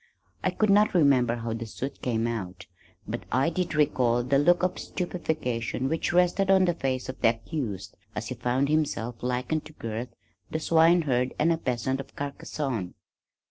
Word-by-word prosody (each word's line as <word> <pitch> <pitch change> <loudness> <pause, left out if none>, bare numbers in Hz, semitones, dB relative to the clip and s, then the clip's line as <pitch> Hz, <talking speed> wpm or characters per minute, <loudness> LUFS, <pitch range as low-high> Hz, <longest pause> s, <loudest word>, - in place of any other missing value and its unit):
I - - +3
could 215 -2 +2
not 205 0 +4
remember 130 -7 +4
how 115 -1 -3
the 115 0 -5
suit 135 +5 -6
came 115 -2 0
out, 95 -6 -4 0.4
but - - -3
I 135 +6 +2
did 175 -1 -2
recall 125 -5 +2
the 135 +3 +2
look 175 +5 +4
of 185 - 0
stupefaction 135 - -2
which 160 - 0
rested 180 +2 +3
on 190 -1 +6
the 175 - +2
face 130 -5 -2
of 130 - -7
the 115 - +6
accused 115 - -4 0.2
as 110 +1 -4
he - - -2
found 125 +3 0
himself 140 -6 -1
likened 125 +5 -1
to 155 - -12
Gurth 115 -2 -5 0.4
the 155 - -2
swine 165 +2 +4
herd 125 -3 0
and 165 +3 +3
a - - -1
peasant 130 0 -1
of 135 - -9
Carcassone. 140 -7 -4
130 Hz, 180 wpm, -27 LUFS, 120-160 Hz, 0.4 s, on